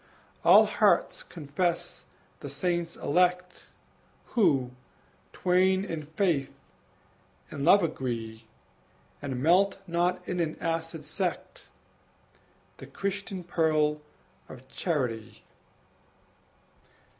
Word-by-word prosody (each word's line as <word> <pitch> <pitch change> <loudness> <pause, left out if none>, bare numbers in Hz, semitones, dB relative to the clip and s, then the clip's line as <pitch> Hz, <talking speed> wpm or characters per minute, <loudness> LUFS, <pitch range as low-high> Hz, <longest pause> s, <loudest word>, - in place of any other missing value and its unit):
All - - +8
hearts - - +2
confess 170 +2 -3 0.3
the - - -7
saints 175 -2 -2
elect 180 0 0 0.6
Who, 145 - +2 0.6
twain 185 +1 +2
in 160 -6 -5
faith, 155 -4 0 1.0
in 140 - -5
love 190 +5 +6
agree, 115 -7 -4 0.7
And 135 -3 -4
melt 190 +5 +4
not 180 +1 -1
in 180 - -2
an 160 -2 -1
acid 165 -1 -3
sect 180 +5 -4 1.1
The - - -11
Christian 195 -1 -4
pearl 155 -3 +1 0.5
of 130 +1 -12
charity! 125 - -3
165 Hz, 85 wpm, -28 LUFS, 145-180 Hz, 1.1 s, All